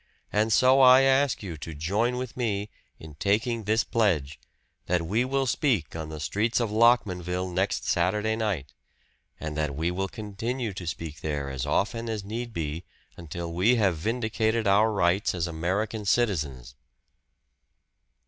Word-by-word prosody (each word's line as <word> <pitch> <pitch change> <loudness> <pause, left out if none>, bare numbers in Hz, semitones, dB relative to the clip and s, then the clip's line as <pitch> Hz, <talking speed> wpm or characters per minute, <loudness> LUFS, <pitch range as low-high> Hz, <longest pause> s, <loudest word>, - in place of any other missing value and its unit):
And 110 +2 +2
so 130 +4 +5
I 130 0 +8
ask 135 -2 +2
you 85 -5 -6
to 80 +1 -8
join 105 +11 0
with 125 -1 -5
me 105 -4 -2 0.3
in 80 -1 -11
taking 110 +2 0
this 110 +2 +2
pledge 75 -11 0 0.5
that 90 -1 +1
we 110 +8 +1
will 135 +1 0
speak 115 - 0
on 80 -1 -5
the 80 -1 -7
streets 110 +10 0
of 115 -3 -1
Lockmanville 95 -6 +2
next 95 +3 0
Saturday 105 +5 +1
night, 100 - -2 0.7
and 75 -1 -5
that 75 -2 -2
we 80 +4 -1
will 95 +2 -2
continue 110 +3 -4
to 90 -2 -7
speak 80 -1 -5
there 70 -3 -3
as 65 +1 -4
often 115 +8 0
as 110 -3 -3
need 115 +4 -5
be 80 -2 -4 0.3
until 85 +1 -6
we 100 +9 +3
have 100 -7 +2
vindicated 110 +4 -1
our 105 +3 +4
rights 95 -1 +1
as 85 -2 -1
American 95 +7 -2
citizens." 75 - 0
100 Hz, 155 wpm, -27 LUFS, 85-115 Hz, 0.7 s, I